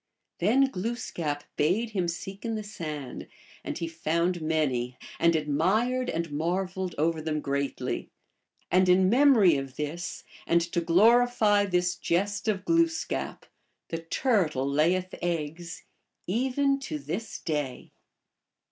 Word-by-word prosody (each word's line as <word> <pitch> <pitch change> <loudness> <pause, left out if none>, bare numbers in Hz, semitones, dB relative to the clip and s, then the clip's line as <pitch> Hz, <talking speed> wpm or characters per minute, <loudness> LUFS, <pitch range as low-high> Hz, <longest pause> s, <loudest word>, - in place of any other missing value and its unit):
Then 230 +9 +4
Glooskap 180 - -3
bade 200 +10 +1
him 185 -4 0
seek 195 +4 -6
in 225 -1 -2
the 215 - -4
sand, 155 -9 -6 0.4
and - - -4
he 165 - -3
found 170 +2 -1
many, 135 -6 0 0.2
and 170 0 +4
admired 195 - +1
and 165 -1 -2
mar 170 +6 0
veled 185 -1 -5
over 160 +1 +1
them 155 -1 -2
greatly; 140 -1 -2 0.6
and 185 +1 +4
in 185 +1 +5
memory 235 - +6
of 135 -1 -6
this, 155 +4 -4 0.2
and 170 - +4
to 170 0 -1
glorify 210 +3 +4
this 180 -1 +1
jest 200 +4 -1
of 200 -3 0
Glooskap, 330 -1 0 0.4
the 165 - -3
Turtle 165 - +1
layeth 175 +6 +1
eggs 170 0 -3 0.4
even 265 +7 +1
to 265 - -4
this 165 +10 -5
day. 150 -5 -4
175 Hz, 130 wpm, -28 LUFS, 155-210 Hz, 0.6 s, memory